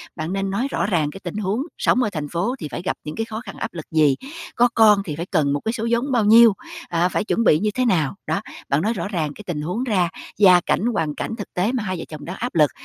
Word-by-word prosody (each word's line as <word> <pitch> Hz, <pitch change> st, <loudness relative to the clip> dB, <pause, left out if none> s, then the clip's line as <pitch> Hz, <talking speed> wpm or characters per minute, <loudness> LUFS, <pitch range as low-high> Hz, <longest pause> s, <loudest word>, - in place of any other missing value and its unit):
Bạn 160 Hz, +4 st, -4 dB
nên 195 Hz, 0 st, -1 dB
nói 235 Hz, +8 st, -1 dB
rõ -, -, 0 dB
ràng 165 Hz, -7 st, +1 dB
cái 195 Hz, -, -10 dB
tình 175 Hz, +2 st, -5 dB
huống 210 Hz, +4 st, -1 dB, 0.2 s
sống 255 Hz, -, +2 dB
ở 215 Hz, -, 0 dB
thành 150 Hz, -4 st, -4 dB
phố 180 Hz, -, -1 dB
thì 155 Hz, -, -5 dB
phải -, -, -4 dB
gặp 185 Hz, -, -2 dB
những 150 Hz, -, -6 dB
cái 225 Hz, -, -2 dB
khó 220 Hz, 0 st, -6 dB
khăn, 200 Hz, -6 st, -9 dB
áp -, -, -4 dB
lực 165 Hz, -3 st, -7 dB
gì, 150 Hz, -4 st, +4 dB, 0.4 s
có 245 Hz, +1 st, +4 dB
con 210 Hz, -3 st, +6 dB
thì 150 Hz, -, -4 dB
phải 165 Hz, +3 st, -4 dB
cần 155 Hz, -7 st, +1 dB
một 145 Hz, -, 0 dB
cái 220 Hz, -, +1 dB
số 230 Hz, -1 st, -3 dB
vốn 240 Hz, +4 st, 0 dB
bao 235 Hz, -4 st, +2 dB
nhiêu, 225 Hz, +1 st, +8 dB, 0.4 s
à, 175 Hz, +1 st, +1 dB
phải 200 Hz, -, -1 dB
chuẩn 230 Hz, -, 0 dB
bị 155 Hz, -8 st, +5 dB
như 210 Hz, +3 st, +1 dB
thế 255 Hz, 0 st, +1 dB
nào. 170 Hz, -, +1 dB
Đó, 200 Hz, -, 0 dB, 0.3 s
bạn 140 Hz, +2 st, +2 dB
nói 220 Hz, +5 st, 0 dB
rõ 180 Hz, -5 st, -3 dB
ràng 165 Hz, -7 st, -2 dB
cái 210 Hz, -, -11 dB
tình 150 Hz, -4 st, -3 dB
huống 180 Hz, +10 st, -2 dB
ra, 190 Hz, -8 st, +1 dB, 0.3 s
gia 185 Hz, -4 st, +7 dB
cảnh, 215 Hz, -, +1 dB
hoàn 155 Hz, -7 st, -1 dB
cảnh 225 Hz, -, -4 dB
thực 205 Hz, -, -8 dB
tế 185 Hz, +6 st, +1 dB
mà 250 Hz, -4 st, -2 dB
hai 185 Hz, -3 st, -3 dB
vợ -, -, -5 dB
chồng 150 Hz, -2 st, -8 dB
đang 180 Hz, +3 st, -5 dB
áp 245 Hz, 0 st, -5 dB
lực, 150 Hz, -3 st, +4 dB
195 Hz, 290 wpm, -22 LUFS, 160-225 Hz, 0.4 s, nhiêu